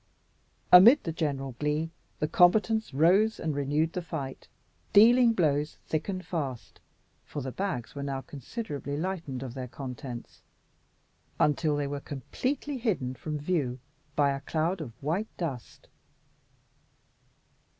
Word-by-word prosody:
Amid 220 +11 +9
the 165 - -2
general 140 -4 -2
glee, 150 +2 -1 0.3
the 150 - 0
combatants 215 +6 +3
rose 185 +10 +4
and 155 - -1
renewed 145 +3 0
the 180 - -2
fight, 140 -6 -6 0.5
dealing 235 +3 +7
blows 150 -7 +1
thick 155 +4 -2
and 185 -1 -4
fast 140 -8 -4 0.4
for 145 - -6
the 130 - -4
bags 135 - -3
were 140 - -6
now 135 -1 -3
considerably 145 - -5
lightened 160 -7 -3
of 125 -3 -6
their 130 -1 -5
contents 125 -1 -8 1.0
until 150 +1 +2
they 145 0 -1
were 140 0 -3
completely 255 - -3
hidden 180 - -1
from 150 +4 -5
view 145 -5 -1 0.4
by 140 -1 +3
a 135 - -2
cloud 165 +4 -1
of 135 -7 -6
white 175 +9 0
dust. 140 -9 -6
150 Hz, 130 wpm, -29 LUFS, 140-185 Hz, 1.0 s, Amid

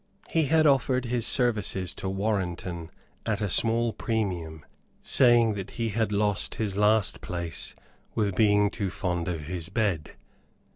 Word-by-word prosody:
He 160 -2 +3
had 160 +2 +3
offered 130 -3 +3
his 120 -1 0
services 105 -7 +1
to 95 - -4
Warrenton 95 -4 -2 0.3
at 105 -3 -1
a 105 - 0
small 115 +3 +1
premium, 90 -9 -3 0.4
saying 120 -3 +4
that 100 -2 -5
he 115 -1 0
had 110 0 0
lost 105 -1 0
his 105 -4 -2
last 105 0 +2
place 85 -3 -5 0.4
with 100 -4 0
being 105 0 +4
too 100 -3 -2
fond 90 -2 -2
of 85 -3 -2
his 85 +2 -5
bed. 95 -6 -1
105 Hz, 145 wpm, -27 LUFS, 90-115 Hz, 0.4 s, saying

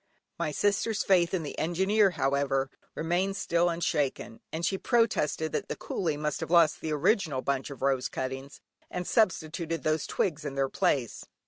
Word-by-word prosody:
My 150 - -1
sister's 205 +6 +1
faith 175 -3 +3
in 185 -4 -1
the 145 - -6
Engineer, 190 +5 +3
however, 135 0 +1 0.2
remained 180 +5 0
still 170 0 +2
unshaken, 145 -8 -1
and 165 +2 -2
she 190 - 0
protested 210 - +1
that - - -2
the - - -2
coolie 160 -6 -2
must 150 -1 -2
have - - -4
lost 170 -3 +4
the 160 - -3
original 155 - +1
bundle 140 0 -2
of - - -10
rose 135 -2 +1
cuttings, 135 +1 -5 0.3
and 180 0 -4
substituted 165 - 0
these 155 0 0
twigs 160 -4 -1
in 140 -2 -5
their 135 -1 +1
place. 125 -4 0
160 Hz, 165 wpm, -29 LUFS, 140-180 Hz, 0.3 s, lost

